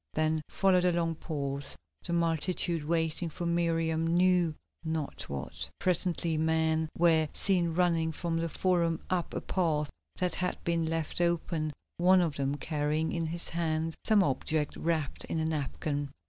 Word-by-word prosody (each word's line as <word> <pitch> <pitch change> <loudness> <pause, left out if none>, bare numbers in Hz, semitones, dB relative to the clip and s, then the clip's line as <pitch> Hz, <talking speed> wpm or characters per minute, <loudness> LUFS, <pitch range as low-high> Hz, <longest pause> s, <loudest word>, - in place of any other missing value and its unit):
Then 155 0 +1
followed 190 -3 +3
a 180 - +4
long 170 -1 0
pause, 140 -3 +1 0.3
the - - -4
multitude 170 0 +1
waiting 165 +1 0
for 175 +2 -5
Miriam 165 -1 +1
knew 175 -1 +3 0.3
not 160 -3 -3
what. 70 -2 -5
Presently 175 -2 +1
men 160 0 +1
were 160 -2 +4
seen 175 -4 +2
running 165 -2 +2
from 165 +1 -2
the 165 0 -1
Forum 170 -2 +1
up 180 -2 0
a - - -2
path 155 -5 0 0.2
that 180 -2 -1
had 180 0 -1
been 170 -1 0
left 165 +1 -2
open, 165 -2 0 0.3
one 185 +2 +5
of 165 -5 +1
them 140 0 0
carrying 150 +1 -1
in 165 -1 -1
his 170 +2 -3
hand 160 -1 -1
some 215 -3 +4
object 150 +1 -1
wrapped 160 -4 -2
in - - -3
a 160 - 0
napkin. 145 -1 -2
165 Hz, 155 wpm, -30 LUFS, 155-170 Hz, 0.3 s, one